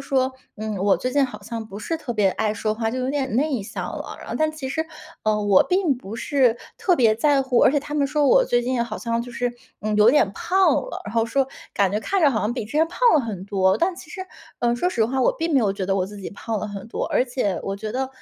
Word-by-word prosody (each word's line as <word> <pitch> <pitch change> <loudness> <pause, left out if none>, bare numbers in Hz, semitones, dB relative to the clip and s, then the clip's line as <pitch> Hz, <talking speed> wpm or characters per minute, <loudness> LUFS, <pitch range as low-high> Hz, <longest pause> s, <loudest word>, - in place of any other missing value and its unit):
说， 260 -1 +2 0.2
嗯， 215 -1 -4
我 195 +1 +3
最 255 - -3
近 285 0 +4
好 255 - -7
像 230 -1 -5
不 205 -2 -8
是 325 +10 -2
特 295 -6 -5
别 210 -4 +2
爱 215 +2 -1
说 215 +1 -1
话， 225 0 -1
就 255 - -3
有 255 +1 -1
点 270 -5 -1
内 275 -4 +1
向 195 - -5
了。 - - -7
然 - - -11
后 - - -4
但 310 0 +2
其 310 -4 -6
实， 320 +4 -1 0.4
呃， 215 -1 +1
我 200 -2 +6
并 360 -7 +1
不 225 -2 -8
是 255 -2 +2 0.2
特 360 -3 +2
别 230 -5 +4
在 280 +4 +3
乎。 260 -2 +1
而 - - +6
且 290 - +2
他 290 +1 -7
们 290 -2 +2
说 295 +1 +1
我 - - +5
最 240 - +1
近 245 -1 0
好 215 -2 -5
像 230 0 -1
就 245 - -9
是， 245 0 -2 0.3
嗯， 215 0 -1
有 210 +2 +7
点 245 -8 +3
胖 380 - +2
了， - - -7
然 205 - -7
后 225 -1 +3
说 270 +3 +1 0.3
感 195 -2 +1
觉 210 - 0
看 390 - 0
着 310 - +6
好 220 -5 0
像 215 - 0
比 245 -3 -4
之 210 - -11
前 310 +2 +3
胖 350 - -11 0.2
了 305 - +5
很 210 -7 -5
多， 190 -1 +2
但 355 +2 +1
其 320 - -12
实， 375 - -7 0.4
呃， 240 0 +2
说 355 - +1
实 230 -10 +1
话， 260 +4 -1
我 250 - +3
并 330 0 -1
没 280 - +5
有 205 -4 +1
觉 195 -1 -4
得 195 - +1
我 185 - +1
自 205 +1 -10
己 190 - -6
胖 220 +2 -4
了 210 - -3
很 200 0 -7
多， - - -3
而 - - +2
且 245 -7 -1
我 195 - -3
觉 215 +1 -5
得， 260 +1 -1
240 Hz, 305 characters per minute, -23 LUFS, 215-280 Hz, 0.4 s, 有